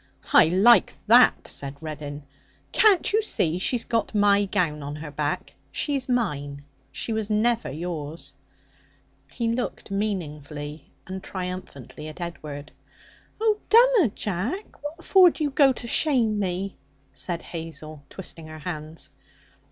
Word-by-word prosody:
'I - - +8
like 195 +5 +5
that,' 235 +3 +6
said 140 0 -4
Reddin. 150 -2 -7 0.5
'Can't 410 -3 +4
you 435 - +4
see 175 - +1
she's 235 +5 +1
got 230 -1 -1
my 205 0 +4
gown 175 -7 0
on 145 +1 -5
her 150 0 -7
back? 145 0 -3 0.2
She's 275 -4 -1
mine. 145 - -1 0.3
She 230 - -3
was 220 -1 -2
never 225 +2 +1
yours.' 160 +1 -6 1.0
He 235 -2 -2
looked 240 -3 -4
meaningly 150 -7 -4 0.2
and 190 0 -6
triumphantly 180 -7 -7
at 155 +3 -9
Edward. 150 -4 -7 0.7
'Oh, 430 -1 +2
dunna, 465 - +6
Jack! 210 - -4
What 320 +4 -7
for 370 -2 +7
do 320 - -4
you 290 - 0
go 275 -1 +5
to 245 - -9
shame 235 -5 +2
me?' 190 0 -2 0.4
said 175 -2 -4
Hazel, 160 -3 -8
twisting 165 -4 -8
her 155 0 -9
hands. 155 -1 -6
185 Hz, 135 wpm, -25 LUFS, 155-240 Hz, 1.0 s, I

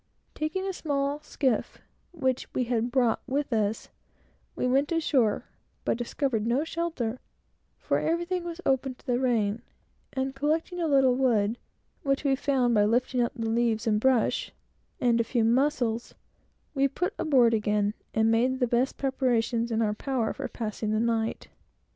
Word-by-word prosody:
Taking 310 +5 -2
a 385 - -2
small 285 -3 -1
skiff 260 -6 -1 0.3
which 260 -7 -1
we 255 - +2
had 235 -1 0
brought 240 -2 +2
with 275 0 -1
us, 215 0 -1 0.7
we - - -1
went 270 +4 +2
ashore, 275 -10 +1 0.4
but 240 - 0
found 235 -7 -1
no 250 +5 +2
shelter, 320 -8 -3 0.6
for - - 0
everything 345 +2 -1
was 340 0 -6
open 265 -1 +1
to - - -25
the 245 -2 +1
rain, 225 -4 +1 0.5
and 265 0 -2
collecting 310 +5 -1
a 330 - +1
little 270 -3 +4
wood, 235 -4 +1 0.4
which 275 0 0
we 275 -2 +3
found 265 -3 +1
by 210 -2 +4
lifting 245 +3 +1
up 235 - 0
the 230 -2 -3
leaves 230 0 +1
and 215 -2 +2
brush, 255 -1 +2 0.5
and 235 -1 +3
a - - +1
few 235 0 0
mussels, 240 -1 +1 0.6
we 275 -1 +3
put 355 +7 -2
aboard 250 -6 +4
again, 210 -1 +1 0.2
and 220 0 +2
made 250 +3 +2
the 250 - +3
best 245 +2 0
preparations 240 -3 0
in 225 0 +1
our 210 -1 +1
power 245 0 -1
for - - -5
passing 215 -1 -4
the 215 0 +1
night. 225 -1 -1
250 Hz, 160 wpm, -27 LUFS, 225-275 Hz, 0.7 s, little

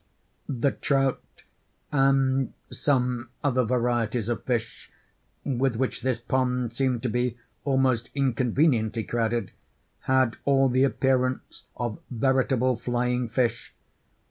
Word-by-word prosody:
The 135 0 +1
trout, 135 -2 0 0.7
and 135 -1 +2 0.2
some 125 -3 0
other 130 -3 +2
varieties 120 -2 0
of 115 -2 -2
fish, 120 -3 -3 0.5
with 130 -2 0
which 130 +3 -2
this 130 -2 0
pond 125 -1 -1
seemed 125 -2 0
to - - +1
be 120 +1 -1 0.3
almost 130 -4 +1
inconveniently 125 -3 +1
crowded, 115 +1 -1 0.6
had 130 -3 +3
all 135 -1 +3
the 130 +2 +3
appearance 130 -1 0
of 120 -3 -3
veritable 130 0 +1
flying 125 0 -1
fish. 115 -1 -1
125 Hz, 110 wpm, -26 LUFS, 120-135 Hz, 0.7 s, had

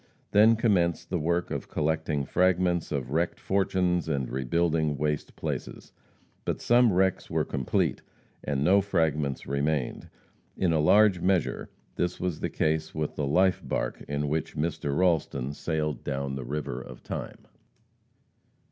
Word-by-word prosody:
Then 110 +3 +6
commenced 90 -8 +1
the 90 - 0
work 85 +3 0
of - - -4
collecting 75 -2 -1
fragments 90 0 +1
of 70 -3 -3
wrecked 85 +3 0
fortunes 90 -3 0
and 70 -4 -1
rebuilding 80 +3 0
waste 75 0 -2
places. - - -5 0.5
But - - -2
some 120 -1 +4
wrecks 95 0 +1
were - - 0
complete, 65 -2 -1 0.4
and 70 -1 -1
no 100 +5 +5
fragments 80 -8 0
remained. 70 -1 -1 0.5
In 90 -3 +2
a 80 - +2
large 100 +4 +5
measure 90 -1 0 0.3
this 90 0 -1
was 90 -3 -2
the - - -2
case 80 0 -1
with 75 -1 -2
the 75 - -1
life 90 +5 +3
barque - - -3
in 75 0 -2
which 75 +1 -2
Mr. 75 -2 -1
Ralston 75 -7 +1
sailed 75 -1 -2
down 70 -1 -3
the 65 -2 -5
river 70 -2 -4
of - - -11
time. - - -6
80 Hz, 145 wpm, -27 LUFS, 70-90 Hz, 0.5 s, Then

